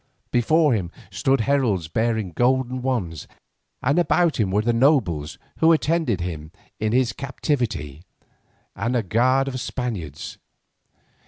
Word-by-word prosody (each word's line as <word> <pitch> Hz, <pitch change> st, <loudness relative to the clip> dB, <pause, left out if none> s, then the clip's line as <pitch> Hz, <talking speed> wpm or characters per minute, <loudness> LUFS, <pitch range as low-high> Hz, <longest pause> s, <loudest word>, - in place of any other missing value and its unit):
Before 150 Hz, +4 st, +3 dB
him 95 Hz, -6 st, -1 dB, 0.2 s
stood 135 Hz, +6 st, +1 dB
heralds 110 Hz, -, +1 dB
bearing 110 Hz, +1 st, -1 dB
golden 130 Hz, +4 st, +1 dB
wands, 105 Hz, -, -2 dB, 0.6 s
and 140 Hz, +6 st, +2 dB
about 170 Hz, -2 st, +2 dB
him 105 Hz, -4 st, +2 dB
were 105 Hz, +3 st, +1 dB
the 120 Hz, +1 st, +1 dB
nobles 110 Hz, -, +2 dB, 0.2 s
who 165 Hz, +1 st, +5 dB
attended 155 Hz, -, +1 dB
him 80 Hz, -3 st, -5 dB, 0.3 s
in 110 Hz, 0 st, 0 dB
his 125 Hz, 0 st, +2 dB
captivity, 120 Hz, -, -3 dB, 0.7 s
and 120 Hz, +2 st, -1 dB
a 120 Hz, -, +1 dB
guard 130 Hz, +7 st, +2 dB
of 130 Hz, -2 st, -4 dB
Spaniards. 100 Hz, -, -5 dB
120 Hz, 130 wpm, -23 LUFS, 95-135 Hz, 0.7 s, who